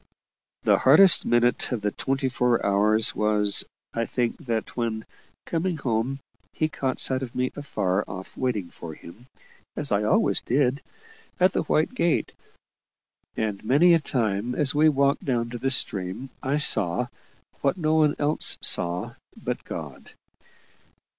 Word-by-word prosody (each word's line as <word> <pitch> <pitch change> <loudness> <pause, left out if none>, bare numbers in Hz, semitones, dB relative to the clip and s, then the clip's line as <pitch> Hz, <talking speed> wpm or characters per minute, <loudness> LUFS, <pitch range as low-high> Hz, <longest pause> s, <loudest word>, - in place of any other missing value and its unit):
The - - +3
hardest 165 +8 +6
minute 120 +2 +1
of 120 -4 -2
the 105 0 -1
twenty 135 +3 -2
four 125 -1 0
hours 105 +2 +3
was, 105 -1 +2 0.3
I 115 0 -1
think, 120 +1 -2
that 115 -2 -3
when, 115 -2 -3 0.4
coming 170 +1 -2
home, 125 0 -2 0.4
he 155 - -1
caught 130 -4 -3
sight 130 0 +1
of 125 -3 -7
me 125 0 -1
afar 100 -9 -1
off 95 0 -9
waiting 110 -9 -2
for 80 -2 -9
him, 110 +12 -14 0.5
as 145 -2 -3
I 100 0 +2
always 105 - +2
did, 135 +1 0 0.6
at 185 +1 +4
the - - 0
white 155 +7 0
gate; 170 -9 0 1.1
and 105 -3 -3
many 145 +10 +4
a 165 - +4
time, 115 -4 -2
as 145 -3 +3
we 155 +2 +4
walked 140 -1 +1
down 120 -3 -1
to 120 - -6
the 135 +3 0
stream, 105 0 -1
I 135 +3 -1
saw 105 - +3 0.6
what 140 +6 0
no 155 -3 0
one 155 -2 +3
else 150 +1 +2
saw 85 +1 +1 0.2
but - - -5
God. - - -9
125 Hz, 150 wpm, -25 LUFS, 110-145 Hz, 1.1 s, hardest